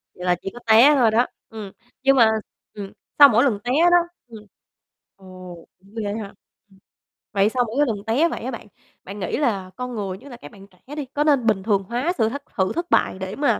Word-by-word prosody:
Vậy 180 - -8
là 180 0 +3
chỉ 195 - -6
có 240 - -10
té 235 +7 +7
thôi 240 -5 +3
đó. 235 +3 +2 0.2
Ừm, 215 -4 -8 0.3
nhưng 275 0 +4
mà 225 -3 +6 0.4
ừm, 200 -2 -8 0.3
sau 285 -1 +10
mỗi 235 +1 +3
lần 235 -8 +1
té 245 - -2 0.2
đó 350 - +7 0.3
ừm, 220 -3 -13 0.7
ồ, 185 -2 -12 0.2
cũng 195 +3 -22
ghê 205 0 -3
ha? 210 -2 -7 0.4
Ưm. 190 - -22 0.5
Vậy 200 0 +3
sau 245 +2 0
mỗi 270 +7 +1
lần 225 - -1
té 280 +10 +2
vậy - - -6
á 255 - -4
bạn, 230 - -9 0.4
bạn 200 +2 -9
nghĩ 180 - -3
là 200 -10 -1
con 250 -1 -6
người, 195 -3 -4
nhất 280 - -14
là 245 - -10
các 245 - -13
bạn 195 -3 -15
trẻ 200 +10 -13
đi, 295 -2 -4
có 295 - +1
nên 285 -5 +2
bình 200 -4 +1
thường 200 -2 +1
hóa 245 - -2
sự 220 -3 +2
hất 280 +4 -7
sự 190 -1 0
thất 340 +1 -4
bại 190 - +1
để 190 +1 -5
mà 285 +3 +1
220 Hz, 235 wpm, -22 LUFS, 195-260 Hz, 0.7 s, sau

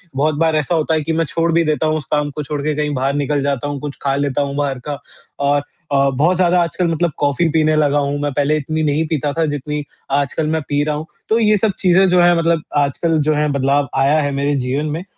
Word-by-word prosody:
बहुत 150 +2 +1
बार 160 0 +1
ऐसा 155 +3 0
होता 160 0 0
है 155 - +1
कि 160 - -2
मैं 165 - +1
छोड़ 165 +2 0
भी 165 +1 +3
देता 155 +1 0
हूँ 155 0 +1
उस 145 - -6
काम 150 -1 +1
को 150 +1 -5
छोड़ 145 +1 -4
के 150 +1 -1
कहीं 150 0 -1
बाहर 135 +1 0
निकल 145 0 0
जाता 140 0 -1
हूँ 145 -1 -4
कुछ 145 -2 -5
खा 135 -1 0
लेता 140 0 0
हूँ 140 0 -3
बाहर 140 -3 -1
का 145 -1 -3 0.5
और 145 0 +2 0.3
अ, 140 0 +3
बहुत 155 +8 +2
ज़्यादा 180 -1 +3
आजकल 170 +2 -1
मतलब 165 0 0
कॉफ़ी 145 +4 +1
पीने 155 0 +2
लगा 145 -1 +2
हूँ 140 0 -1
मैं 145 -1 -1
पहले 145 +2 +1
इतनी 155 +2 -2
नहीं 150 +2 +1
पीता 150 -2 -1
था 165 -1 0
जितनी 150 0 -3 0.3
आजकल 145 +2 0
मैं 160 0 0
पी 145 0 +1
रहा 150 0 -1
हूँ। 155 +2 -5 0.2
तो 225 +1 +3
ये 210 -1 +3
सब 215 +1 +1
चीज़ें 190 +1 +4
जो 180 0 +4
है 175 0 +5
मतलब 165 -1 +1 0.2
आजकल 150 +3 +1
जो 155 - +4
है 150 0 +1
बदलाव 140 +1 +1
आया 140 +3 +3
है 145 -1 -1
मेरे 140 +1 0
जीवन 135 +3 -1
में। 165 +4 -4
150 Hz, 255 wpm, -18 LUFS, 140-160 Hz, 0.5 s, है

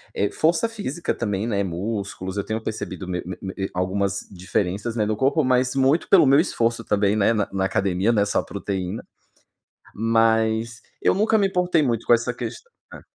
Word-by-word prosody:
eh, 100 - 0
força 170 +8 +2
física 175 - -3
também, 105 -2 -2
né, 100 -3 0
músculos, 95 +1 -4
eu 100 - 0
tenho 110 +1 -3
percebido 105 -4 -5
me 90 -1 -2
me 90 0 -6
me 95 -1 -5 0.2
algumas 100 +2 -1
diferenças, 95 +4 -2
né, 110 -3 +1
no 110 - 0
corpo 140 +4 +2
mas 130 0 +2
muito 135 +4 +2
pelo 180 -6 +7
meu 135 +2 +6
esforço 115 -8 0
também, 105 -1 +1
né, 110 +2 +3
na 105 -3 0
na 95 0 0
academia. 95 +2 +1
Não 110 -3 +2
é - - 0
só 100 - 0
proteína. 100 0 -4 0.9
Mas 115 0 +1 0.2
eu - - +3
nunca 220 +3 +2
me 200 -2 +3
importei 180 -4 +1
muito 120 -4 -1
com 120 - +6
essa 120 +1 +1
questão, 445 - -7 0.2
né. - - -10
110 Hz, 185 wpm, -23 LUFS, 100-130 Hz, 0.9 s, pelo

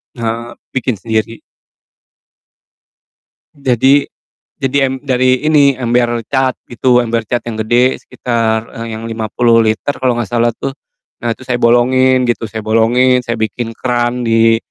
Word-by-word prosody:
Eee, 115 0 -4 0.2
bikin 125 -3 -1
sendiri. 110 +2 -3 2.1
Jadi 135 +1 +3 0.5
jadi 135 -1 +1
em 135 - -4
dari 130 0 +1
ini 145 -4 +4
ember 120 -2 0
cat 130 -2 0
gitu, 125 +1 +2
ember 115 -1 0
cat 120 - -1
yang 110 -2 -4
gede, 120 +4 +2
sekitar, 115 -2 -1 0.2
eee, 115 -1 -5
yang 115 - -7
50 115 +1 +1
liter 110 +5 0
kalo 125 -2 +1
gak 120 - -1
salah 120 +1 +1
tuh, 135 - -5 0.5
nah, 120 - -2
itu 130 +3 -7
saya 125 -1 -2
bolongin 130 +2 +3
gitu, 120 -2 -2
saya 110 -1 -6
bolongin, 120 +3 +3
saya 115 -1 -4
bikin 110 +2 -3
keran 120 0 -1
di 115 0 +4
120 Hz, 145 wpm, -15 LUFS, 115-130 Hz, 2.1 s, ini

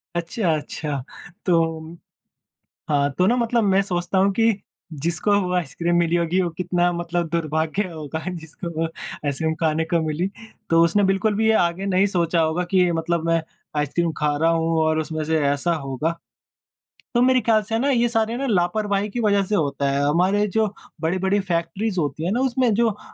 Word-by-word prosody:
अच्छा, 175 +1 0
अच्छा 145 -2 -4 0.4
तो 165 -2 0 0.9
हाँ 145 -1 +2
तो 180 - +4
न 220 - +4
मतलब 235 -1 +1
मैं 195 -1 +4
सोचता 180 0 -1
हूँ 195 +1 +3
कि 225 +3 +3 0.5
जिसको 170 +5 0
वो 180 -2 -2
आइसक्रीम 170 +1 -1
मिली 170 0 +2
होगी 170 +2 +1
वो 175 - 0
कितना 175 0 +1
मतलब 170 0 -2
दुर्भाग्य 160 +3 -1
होगा 160 0 -6
जिसको 170 0 -7
वो 165 - +1
आइसक्रीम 160 -1 -4
खाने 160 0 +1
को 165 +1 0
मिली। 160 +5 -1 0.4
तो 165 0 +5
उसने 170 +5 +2
बिल्कुल 195 +3 +1
भी 220 +1 +1
ये 220 - +5
आगे 175 +3 -1
नहीं 195 +1 +3
सोचा 170 -3 +1
होगा 160 +3 +1
कि 180 -2 +4
मतलब 165 0 -1
मैं 165 -1 +2 0.3
आइसक्रीम 160 +3 0
खा 150 -1 +1
रहा 165 +1 +4
हूँ 165 0 +1
और 155 0 +2
उसमें 155 0 -3
से 160 +1 +1
ऐसा 145 +5 +1
होगा। 150 +2 -3 1.0
तो 240 - +4
मेरे 255 0 +4
ख्याल 215 -1 +3
से 225 - -5
है 225 - +1
ना 280 +3 +1
ये 240 -2 +3
सारे 225 0 0
न 275 +2 -2
लापरवाही 200 +2 +1
की 240 - -3
वज़ह 200 -3 +3
से 210 - -1
होता 140 -5 0
है। 140 0 0
हमारे 185 +7 +2
जो 220 - +4 0.3
बड़ी-बड़ी 190 +4 +1
फैक्ट्रीज़ 185 +2 -1
होती 150 +1 -2
हैं 180 - 0
ना 240 - 0
उसमें 255 -2 +2
जो 230 +2 +3
अ, 210 - -9
175 Hz, 190 wpm, -22 LUFS, 160-200 Hz, 1.0 s, तो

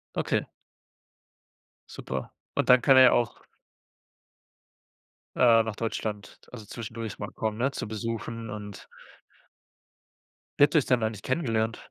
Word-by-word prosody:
Okay. - - 0 1.4
Super, 65 0 -6 0.2
und - - 0
dann 125 -1 +7
kann 135 0 +5
er 130 - +9
ja 125 - +7
auch 120 -1 0 1.9
äh, 115 -2 +5
nach 110 -1 -5
Deutschland, 110 -2 -4
also 110 -4 -9
zwischendurch 115 0 -7
mal - - -5
kommen, 110 -1 -3
ne? 135 +3 0
Zu 115 - -5
besuchen 115 +1 -5
und 105 -2 -8 1.7
Wie - - +7
habt 145 +3 +4
ihr 155 - +7
euch - - -2
denn 125 -3 +2
eigentlich 110 -2 -3
kennengelernt? 115 -6 -1
115 Hz, 130 wpm, -27 LUFS, 110-125 Hz, 1.9 s, er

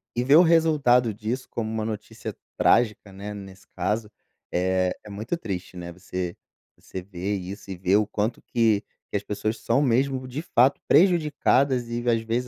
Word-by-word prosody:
E 120 - +1
ver 140 +4 +5
o 175 - +9
resultado 150 -8 +4
disso 110 +5 -4
como 110 -1 -3
uma 110 -1 -2
notícia 110 -1 -6 0.2
trágica, 105 -4 +2
né, 100 +2 -7
nesse 95 -2 -11
caso, 105 +4 -1 0.4
eh, 90 0 +1
é 105 - -11
muito 110 +11 -3
triste, 95 - -5
né, 85 -1 -7
você 90 0 -5 0.4
você 95 - -7
ver 95 +2 -3
isso 95 +2 -8
e 95 - -5
ver 95 +3 +3
o 105 -1 +1
quanto 110 +2 -2
que 110 -3 +1 0.3
que - - +1
as 100 - -5
pessoas 110 +2 -3
são 135 - +1
mesmo, 130 0 +1
de 135 +5 -4
fato, 135 -5 +3
prejudicadas, 145 -7 +3
e 120 0 -3
às 115 -1 +2
vezes 120 +3 -2
110 Hz, 180 wpm, -25 LUFS, 100-125 Hz, 0.4 s, o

